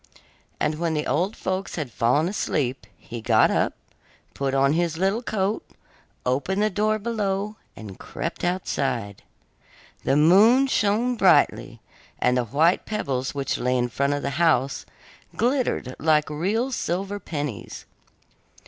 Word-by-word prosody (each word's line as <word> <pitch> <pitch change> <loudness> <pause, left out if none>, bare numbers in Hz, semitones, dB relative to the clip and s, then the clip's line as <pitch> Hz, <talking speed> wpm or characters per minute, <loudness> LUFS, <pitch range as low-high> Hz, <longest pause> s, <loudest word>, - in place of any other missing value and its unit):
And 150 +1 -1
when 165 -2 0
the 150 - -1
old 185 +8 0
folks 190 +1 -3
had 150 -7 -4
fallen 125 +9 +2
asleep, 135 - -2
he 115 +6 -8
got - - +4
up, - - 0 0.6
put 135 -1 -2
on 135 +1 +3
his 165 -1 0
little 195 +6 +1
coat, 210 -3 -1 0.6
opened 145 +11 0
the 215 - +1
door 215 +2 +1
below, 210 -2 -2 0.2
and 105 -4 -10
crept - - -5
outside. 135 - -2 0.8
The - - +2
moon 205 - +6
shone 235 0 +1
brightly, 145 - +3 0.4
and 125 - +2
the 125 -1 +1
white 155 - +2
pebbles 135 -12 -2
which 140 -2 -2
lay 125 +1 +1
in 125 0 0
front 140 +4 0
of 145 - -4
the 140 - -1
house 155 -5 +2 0.5
glittered 245 - 0
like 155 -1 +2
real 210 - -1
silver 195 -1 -2
pennies. 145 - -5
165 Hz, 140 wpm, -24 LUFS, 135-205 Hz, 0.8 s, moon